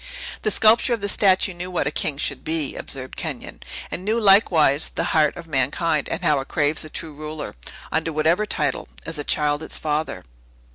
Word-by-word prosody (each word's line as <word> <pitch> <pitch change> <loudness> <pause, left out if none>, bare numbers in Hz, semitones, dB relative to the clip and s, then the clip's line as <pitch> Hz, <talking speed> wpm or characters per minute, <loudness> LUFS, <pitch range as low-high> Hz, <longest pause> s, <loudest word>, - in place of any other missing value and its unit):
"The - - 0
sculptor 225 +4 +4
of 225 - -12
this 200 0 +1
statue 190 -1 +3
knew 175 +1 -5
what 180 -5 -1
a 145 - 0
king 145 -1 0
should - - -1
be," 160 -3 -1
observed 130 -1 -4
Kenyon, - - -6 0.3
"and 180 - -4
knew, 220 +4 +1
likewise, 175 -8 +4
the - - -2
heart 155 -2 +3
of 170 - -8
mankind, 150 +2 0
and 170 +2 -3
how 150 -4 +3
it 135 - -6
craves 150 0 +1
a 155 - -6
true 155 0 -5
ruler, 155 +1 -6 0.4
under 160 +1 0
whatever 160 +7 +1
title, - - -2 0.2
as 165 0 -4
a - - -2
child 145 0 +1
its 160 - -5
father." 155 0 -2
160 Hz, 195 wpm, -22 LUFS, 150-185 Hz, 0.4 s, sculptor